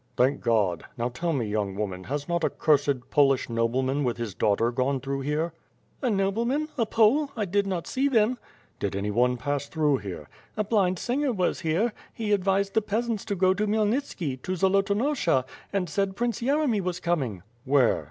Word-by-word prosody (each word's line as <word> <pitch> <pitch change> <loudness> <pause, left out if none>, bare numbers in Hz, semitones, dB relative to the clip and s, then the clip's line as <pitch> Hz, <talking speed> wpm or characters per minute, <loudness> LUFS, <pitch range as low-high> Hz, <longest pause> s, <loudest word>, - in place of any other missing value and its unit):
"Thank 130 +3 +2
God! 100 -8 +1
Now, 120 +1 -1
tell 165 +8 -2
me 135 -7 0
young 105 -2 -2
woman, 95 -3 -4
has 145 +1 -3
not 170 -1 -1
a - - +3
cursed 140 -4 +1
Polish 135 -4 +3
nobleman 130 +5 0
with 125 -3 -1
his 115 -4 -4
daughter 105 +6 +1
gone 130 +2 0
through 135 +1 -3
here?" 150 +4 -1 0.5
"A 255 - +1
nobleman? 230 +9 0
A 230 -5 0
Pole? 235 +8 +3
I 215 - 0
did 200 +2 0
not 180 -3 -2
see 270 +2 0
them." 240 -1 +2 0.4
"Did 100 -1 -2
anyone 115 +5 +1
pass 145 +3 -2
through 150 -3 +1
here?" 95 - -7 0.3
"A 215 - +2
blind 195 -4 +1
singer 265 +6 0
was 185 -6 0
here. 185 +7 0 0.2
He 220 -2 -2
advised 195 0 +1
the 220 - +3
peasants 220 +1 -2
to 205 -2 -2
go 185 0 +3
to 210 +2 -1
Khmyelnitski, 210 - -1
to 185 - -2
Zolotonosha, 195 - +2 0.3
and 195 -3 0
said 195 +3 -1
Prince 235 +2 -1
Yeremy 270 -4 +1
was 180 -1 -3
coming." 135 - -1 0.2
"Where?" 135 -3 +3
175 Hz, 180 wpm, -26 LUFS, 130-210 Hz, 0.5 s, a